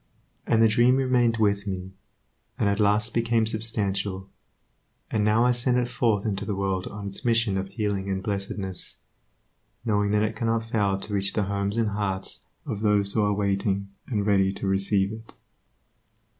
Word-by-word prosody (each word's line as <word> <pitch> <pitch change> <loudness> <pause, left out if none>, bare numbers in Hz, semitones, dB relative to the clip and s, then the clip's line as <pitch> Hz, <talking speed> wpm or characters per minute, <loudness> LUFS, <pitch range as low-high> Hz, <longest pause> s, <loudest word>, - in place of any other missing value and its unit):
And 115 0 +4
the - - +7
dream 120 +4 +4
remained 125 -3 +2
with 100 -2 +1
me, 95 -1 -4 0.7
and - - +1
at 100 +1 +1
last 105 +2 +2
became 115 -1 +2
substantial; 100 -4 -2 0.8
and 105 - +1
now 110 +3 +3
I 125 - +4
send 125 +1 +2
it 125 -1 +1
forth 115 -4 +1
into 100 -2 -2
the 100 0 -2
world 95 -1 -1
on 100 0 -7
its 100 - -3
mission 115 -4 +2
of 95 0 -2
healing 100 -2 -2
and 95 -1 -2
blessedness, 100 -2 -4 0.9
knowing 105 -2 +1
that 105 +1 +2
it 110 0 -1
cannot 115 0 -1
fail 100 -4 +1
to 105 - -7
reach 100 -1 0
the 105 - +1
homes 100 +2 -2
and 115 -2 +2
hearts 100 -2 -1 0.2
of 100 - -4
those 100 -2 +2
who 110 - +2
are 105 0 +2
waiting 100 -1 0 0.2
and 105 -5 -1
ready 95 -2 +3
to 100 - -5
receive 95 +1 +1
it. 110 0 -10
105 Hz, 175 wpm, -26 LUFS, 100-115 Hz, 0.9 s, the